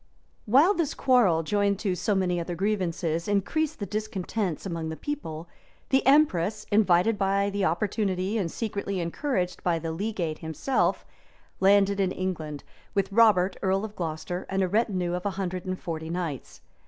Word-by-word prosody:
] - - -39
While 330 +9 +7
this 335 -7 -1
quarrel, 215 -11 +3
joined 200 +3 +1
to 195 -4 0
so 205 +3 0
many 180 -2 +1
other 170 +1 -4
grievances, 170 -4 -1
increased 290 +10 0
the 205 - -4
discontents 210 -3 -3
among 165 -4 -3
the 160 - -4
people, 170 - -5 0.4
the 265 0 +3
empress, 215 - +3
invited 205 0 +3
by 200 +1 +1
the 200 -1 0
opportunity, 195 +2 0
and 180 -5 -1
secretly 200 -3 -3
encouraged 180 - -2
by 175 -2 +1
the 165 0 -4
legate 175 -3 -3
himself, 160 - 0 0.5
landed 200 0 +4
in 190 -2 +2
England, 160 -7 -4 0.3
with 195 0 0
Robert, 200 -4 +4
earl 195 +1 +1
of 210 -1 -9
Glocester, 175 +1 -4
and 195 0 +1
a - - +1
retinue 185 -3 0
of 180 0 -3
a 205 - 0
hundred 185 -1 -3
and 185 0 -3
forty 160 -1 -5
knights. 165 -7 -5
190 Hz, 165 wpm, -27 LUFS, 175-210 Hz, 0.5 s, While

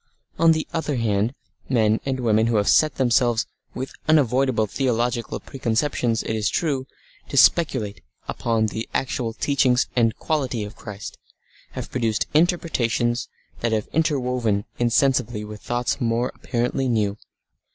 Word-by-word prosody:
On 165 0 +6
the 160 -1 -2
other 160 -3 -1
hand 110 +1 0 0.3
men 110 -4 +3
and 130 -1 -1
women 110 -1 +3
who 115 - +1
have 105 -1 +2
set 155 -3 +4
themselves, 120 -3 +2 0.3
with 130 +1 -5
unavoidable 130 -6 +3
theological 120 0 -1
preconceptions, 120 -2 -1
it 110 - -2
is 110 0 0
true, 140 -5 -1 0.4
to - - -3
speculate 130 -11 +3 0.3
upon 115 -2 0
the 110 +2 -4
actual 125 -3 -1
teachings 130 0 +2
and 115 -3 +2
quality 130 -8 -1
of 105 +1 -8
Christ, 105 -2 -8 0.5
have - - -6
produced 115 -4 0
interpretations 130 -8 +1 0.3
that 115 -1 0
have 110 -1 -1
interwoven 125 -9 0
insensibly 120 -2 +2
with 105 0 -9
thoughts 120 0 -2
more 120 +1 0
apparently 125 +2 -1
new. 110 -3 0
120 Hz, 135 wpm, -23 LUFS, 110-135 Hz, 0.5 s, On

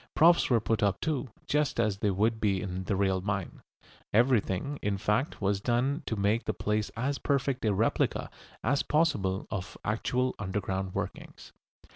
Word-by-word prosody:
Props 170 +2 +5
were 120 -3 +4
put 110 0 0
up 100 -3 +2
too, 145 -4 -2 0.2
just 150 -4 0
as 105 -4 +1
they 105 - +1
would 110 +4 +1
be 100 -3 +2
in 95 -1 -4
the 100 - 0
real 95 -1 +1
mine. 95 -2 -3 0.5
Everything, 120 +2 +2
in 100 -1 0
fact, 105 +8 0
was 100 0 +1
done 130 +7 +1
to 110 - -1
make 105 +3 +1
the 110 - -1
place 105 +1 -1
as 140 +4 -1
perfect 140 -1 0
a 110 - +3
replica 105 +4 0 0.3
as 140 +4 +2
possible 110 - +1
of 95 0 -5
actual 125 +4 0
underground 95 -1 -3
workings. - - -6
105 Hz, 165 wpm, -29 LUFS, 100-130 Hz, 0.5 s, Props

